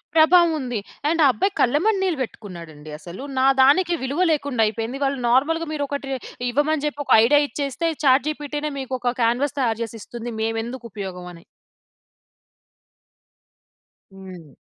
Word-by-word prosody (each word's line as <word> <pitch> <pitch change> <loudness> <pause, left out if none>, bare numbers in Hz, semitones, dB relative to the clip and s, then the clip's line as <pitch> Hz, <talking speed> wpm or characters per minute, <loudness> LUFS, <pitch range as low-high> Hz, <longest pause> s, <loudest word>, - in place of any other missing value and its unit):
ప్రభావముంది. 315 -7 +4 0.3
And 330 +1 +1
ఆ - - +7
అబ్బాయి 385 +9 -1
కళ్ళెమ్మడ 310 - +2
నీళ్లు 355 -6 -1
వెట్టుకున్నాడండి 170 -9 -10
అసలు. 175 +7 -10 0.2
నా 260 - +3 0.2
దానికి 345 +7 +4
విలువ 280 +6 -2
లేకుండయిపోయింది, 245 -4 -1
వాళ్ళు 275 -1 0
నార్మల్‌గా 325 +7 +2
మీరొక 285 -1 -2
ట్రే 270 0 -3 0.4
ఇవ్వమని 295 +3 0
జెప్పి 295 -1 -3
ఒక - - -5
ఐడియా 290 +5 +5
ఇచ్చేస్తే, 285 +2 -3 0.2
చాట్‌‌జీపీటీ‌‌‌‌‌‌‌‌‌‌‌‌‌‌‌‌‌‌‌‌‌‌‌‌‌నే 295 +2 +1
మీకొక 255 -2 -2
కాన్వస్ 250 +5 +1
తయారు 230 -4 0
జేసిస్తుంది 230 +1 -8
మేవెందుకుపయోగవని. 215 -7 -5 2.7
హ్మ్. 185 -5 -11
265 Hz, 115 wpm, -22 LUFS, 225-295 Hz, 2.7 s, ఆ